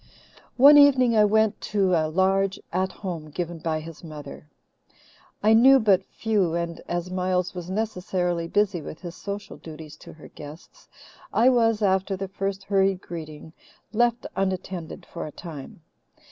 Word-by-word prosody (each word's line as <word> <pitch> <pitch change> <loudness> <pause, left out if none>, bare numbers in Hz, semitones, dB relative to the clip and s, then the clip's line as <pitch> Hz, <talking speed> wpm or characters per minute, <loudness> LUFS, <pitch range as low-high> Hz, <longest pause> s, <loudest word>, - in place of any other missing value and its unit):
"One 285 +3 +9
evening 260 -5 +5
I 210 -1 +6
went 220 0 +2
to 195 -3 0
a 160 -2 +2
large 190 +3 +1
At 185 +1 0
Home 170 -7 -6
given 170 +2 -5
by 160 -1 -2
his 165 +1 -11
mother. 150 -2 -10 0.9
I 215 +1 +5
knew 265 +4 +7
but 195 -5 +3
few 200 -7 0
and, 170 -1 -3
as 175 +1 -3
Miles 185 0 -1
was 180 -1 -7
necessarily 180 -4 -2
busy 200 -2 0
with 155 - -9
his 175 -2 -7
social 200 0 -7
duties 155 -1 -11
to - - -13
her 155 - -14
guests, 150 +3 -13 0.4
I 240 +3 +4
was, 225 -3 +2
after 190 0 +1
the 195 +1 -4
first 195 0 -4
hurried 195 -1 +1
greeting, 160 -3 -9 0.4
left 240 +1 +1
unattended 185 -3 -4
for 170 - -7
a - - -8
time. 155 -1 -10
185 Hz, 155 wpm, -25 LUFS, 170-205 Hz, 0.9 s, One